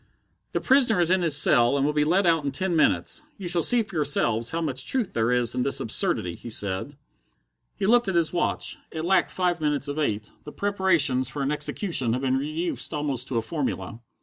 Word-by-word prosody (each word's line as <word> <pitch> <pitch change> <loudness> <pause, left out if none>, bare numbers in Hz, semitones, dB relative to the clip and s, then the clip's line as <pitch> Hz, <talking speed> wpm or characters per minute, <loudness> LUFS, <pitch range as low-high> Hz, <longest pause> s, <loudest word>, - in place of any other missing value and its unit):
"The - - -1
prisoner 255 -7 +3
is 175 0 +2
in 185 0 +3
his 160 -4 +4
cell, 120 0 +4
and 140 - +1
will 150 - 0
be 150 0 +2
led 180 +6 +2
out 165 -3 +2
in 140 - -1
ten 180 +5 -1
minutes. 160 - +1 0.2
You 195 -4 -6
shall 175 0 +2
see 240 +6 +4
for 195 - -12
yourselves 125 -6 +1
how 165 - -3
much 135 -5 -3
truth 245 -8 -1
there 115 0 0
it 120 -2 +1
in 125 - -1
this 135 +2 +1
absurdity," 90 -1 0
he 120 - -10
said. 105 +6 -3 0.8
He 200 - -3
looked 240 +2 +3
at 190 - -1
his 170 -1 +1
watch. 175 - -1
It 160 0 -5
lacked 185 0 +2
five 175 -2 -1
minutes 150 -2 0
of 145 +2 -4
eight. 110 -8 -2
The 150 - -9
preparations 170 -11 +1
for 140 0 -4
an 135 - -1
execution 150 - -1
had 130 +2 -3
been 130 0 +1
reduced 155 +3 -3
almost 140 -4 -3
to 125 - -2
a 115 - 0
formula. 130 -4 -4
150 Hz, 220 wpm, -25 LUFS, 130-175 Hz, 0.8 s, his